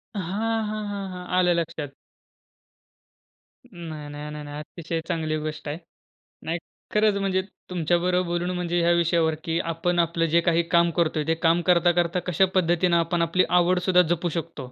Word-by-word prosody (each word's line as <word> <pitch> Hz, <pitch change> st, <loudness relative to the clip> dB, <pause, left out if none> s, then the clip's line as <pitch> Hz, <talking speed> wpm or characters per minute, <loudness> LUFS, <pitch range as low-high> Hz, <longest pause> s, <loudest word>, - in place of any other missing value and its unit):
हां, 215 Hz, +4 st, -1 dB
हां, 215 Hz, -1 st, -4 dB
हां, 200 Hz, -1 st, -4 dB
हां. 180 Hz, 0 st, -8 dB
आलं 180 Hz, -1 st, +4 dB
लक्षात. 165 Hz, -3 st, -3 dB, 1.8 s
नाही, 165 Hz, -9 st, -8 dB
नाही, 145 Hz, +1 st, -7 dB
नाही, 150 Hz, 0 st, -7 dB
नाही. 145 Hz, 0 st, -7 dB
अतिशय 165 Hz, +1 st, -5 dB
चांगली 155 Hz, -1 st, -1 dB
गोष्ट 155 Hz, 0 st, -5 dB
आहे. 145 Hz, -, -3 dB, 0.7 s
नाही 165 Hz, +2 st, -1 dB, 0.4 s
खरंच 210 Hz, -1 st, +3 dB
म्हणजे 190 Hz, -1 st, +1 dB, 0.3 s
तुमच्याबरोबर 180 Hz, +1 st, +1 dB
बोलून 175 Hz, +1 st, -1 dB
म्हणजे 175 Hz, 0 st, -1 dB
ह्या 170 Hz, -, +3 dB
विषयावर, 170 Hz, -2 st, +2 dB
की 165 Hz, 0 st, -1 dB
आपण 170 Hz, +1 st, -1 dB
आपलं 170 Hz, 0 st, +1 dB
जे 165 Hz, +1 st, +3 dB
काही 170 Hz, 0 st, +2 dB
काम 170 Hz, -1 st, +4 dB
करतोय. 155 Hz, -2 st, +1 dB
ते 165 Hz, -, +2 dB
काम 165 Hz, +1 st, +2 dB
करता-करता 175 Hz, 0 st, +3 dB
कशा 180 Hz, +2 st, +3 dB
पद्धतीनं 175 Hz, 0 st, +3 dB
आपण 170 Hz, +1 st, 0 dB
आपली 170 Hz, +2 st, +2 dB
आवडसुद्धा 180 Hz, +1 st, +4 dB
जपू 175 Hz, +1 st, -2 dB
शकतो. 140 Hz, -6 st, -9 dB
170 Hz, 160 wpm, -25 LUFS, 165-180 Hz, 1.8 s, आलं